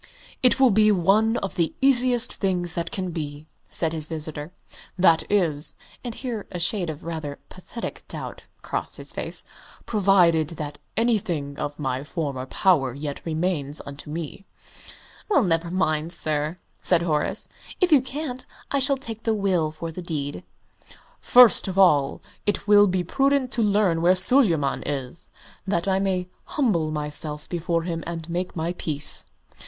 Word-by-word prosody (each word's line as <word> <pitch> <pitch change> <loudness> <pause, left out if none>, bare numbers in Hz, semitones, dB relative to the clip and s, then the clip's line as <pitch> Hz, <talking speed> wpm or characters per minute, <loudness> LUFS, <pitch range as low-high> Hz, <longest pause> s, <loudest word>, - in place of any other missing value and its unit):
"It 255 +1 +4
will 260 -3 +6
be 215 +1 +5
one 210 +5 +3
of 195 - -6
the 170 -2 -1
easiest 255 -3 +4
things 180 -3 -1
that 170 -1 -2
can 185 -2 -3
be," 150 -2 -5 0.2
said 165 -1 +1
his 155 -2 +1
visitor, 155 0 -5 0.5
"that 170 -3 +5
is" 165 -7 +1 0.3
(and 240 -2 -5
here 235 -6 -5
a 180 - -4
shade 180 0 0
of 155 -1 -7
rather 155 -4 -5
pathetic 185 +5 -7
doubt - - -7 0.2
crossed - - -2
his - - -5
face) - - -2 0.4
"provided 180 -7 +3
that 150 -1 -6 0.2
anything 190 -11 0
of 145 0 -4
my 135 -2 -2
former 145 -5 -4
power 135 -8 +2
yet 145 0 -5
remains 155 -3 -1
unto 140 +1 -8
me." 165 +5 -6 0.8
"Well, 385 - +4
never 170 -2 +1
mind, 160 -3 0
sir," 155 +1 0 0.2
said 175 -2 +2
Horace; 150 -3 -1 0.3
"if 365 -2 +2
you 290 -4 +7
can't, 260 -1 -5 0.2
I 280 - +2
shall 275 +1 +2
take 225 -4 -6
the 225 -1 0
will 185 -6 +1
for 165 +2 -6
the 180 - -7
deed." 145 - -4 0.8
"First 245 -4 +6
of 190 0 -4
all, 150 -8 +4 0.2
it 205 0 -1
will 205 0 +7
be 185 -1 0
prudent 275 +5 +1
to 235 - -1
learn 200 -5 +2
where 180 +2 +5
Suleyman 180 - +3
is, 140 +1 -3 0.4
that 175 -1 0
I 190 0 +2
may 185 -2 -1 0.2
humble 200 - 0
myself 150 0 -3
before 170 -1 -1
him 165 -1 -3
and 165 -1 -5
make 180 +1 -3
my 165 +1 -2
peace." 150 -2 -3
175 Hz, 160 wpm, -24 LUFS, 155-205 Hz, 0.8 s, you